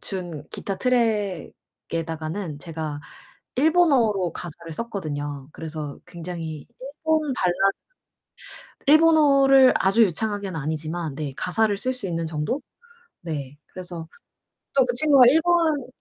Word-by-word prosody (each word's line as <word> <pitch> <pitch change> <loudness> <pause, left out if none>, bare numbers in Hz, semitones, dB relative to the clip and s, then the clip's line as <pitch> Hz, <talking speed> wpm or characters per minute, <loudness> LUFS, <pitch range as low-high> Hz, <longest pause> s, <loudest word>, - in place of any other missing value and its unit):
준 175 -6 -5
기타 195 - -4
트랙에다가는 185 - -2
제가 155 -2 -5 0.6
일본어로 260 - +3
가사를 170 -1 -8
썼거든요. 145 - -5
그래서 155 -3 -7
굉장히 165 -3 -7 0.2
일본 305 +1 -1
발라드 195 -1 +1 1.1
일본어를 280 -4 +6
아주 195 +5 +4
유창하게는 200 -1 -2
아니지만 155 +1 -4
네 145 -2 -4
가사를 205 +5 +1
쓸 255 +5 -1
수 250 -6 -4
있는 165 -2 -2
정도? 160 - -2 0.6
네. 145 -5 -6
그래서 175 -3 -8 0.7
또 265 - +6
그 245 - -1
친구가 275 -1 +7
일본 320 -1 +3
190 Hz, 260 characters per minute, -24 LUFS, 160-255 Hz, 1.1 s, 친구가